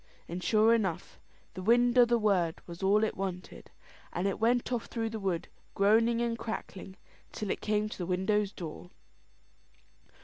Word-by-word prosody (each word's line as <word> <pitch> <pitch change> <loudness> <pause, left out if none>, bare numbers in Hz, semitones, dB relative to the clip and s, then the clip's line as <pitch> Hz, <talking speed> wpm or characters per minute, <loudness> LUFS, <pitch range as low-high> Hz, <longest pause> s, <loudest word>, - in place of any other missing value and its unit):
And 180 +2 -5
sure 220 +1 +4
enough, 195 -8 -2 0.3
the 185 - -7
wind 240 +4 +3
o' 245 -1 +7
the 240 0 +2
word 190 -7 +1
was 170 +1 -10
all 200 +3 +3
it 220 - 0
wanted. 185 -1 -6 0.5
It 190 +3 -1
went 240 +3 +1
off 240 -2 -2
through 225 -2 -3
the 220 - -4
wood, 190 -4 -2 0.3
groaning 225 +4 +3
and 230 -1 -2
crackling, 200 -4 -6 0.4
till 210 -3 -4
it - - -3
came 210 0 0
to 215 - -8
the 175 - -3
widow's 190 +2 +1
door. 175 -1 -8
210 Hz, 165 wpm, -30 LUFS, 185-230 Hz, 0.5 s, o